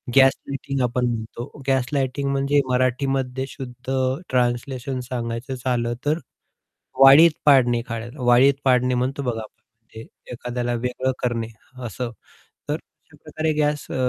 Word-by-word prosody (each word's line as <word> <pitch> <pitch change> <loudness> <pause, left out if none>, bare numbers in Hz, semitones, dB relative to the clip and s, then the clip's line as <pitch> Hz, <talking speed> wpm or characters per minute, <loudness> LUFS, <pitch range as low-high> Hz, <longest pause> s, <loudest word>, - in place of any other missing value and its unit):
Gaslighting 135 0 +2
आपण 125 0 +1
म्हणतो, 120 +4 -5
gaslighting 135 +1 0
म्हणजे 140 +1 +2
मराठीमध्ये 130 +1 0
शुद्ध 130 -1 -8 0.4
ट्रान्सलेशन 125 +1 -1
सांगायचं 120 0 -4
झालं, 120 -2 0
तर 150 +2 +2 0.8
वाळीत 140 +5 +9
पाडणे 125 -4 +5
एखाद्याला. 120 +3 -6
वाळीत 125 +3 +6
पाडणे 125 -1 +3
म्हणतो 130 +3 -1
बघा 115 -3 -2
आपण, 110 +1 -15 0.3
एखाद्याला 120 0 -3
वेगळं 125 +2 -1
करणे, 120 -2 -1 0.4
असं. 120 +2 -4 0.6
तर - - +2
अशा - - -16
प्रकारे 160 0 -2
गॅस 150 -1 0
अ, - - -3
125 Hz, 120 wpm, -23 LUFS, 120-135 Hz, 0.8 s, वाळीत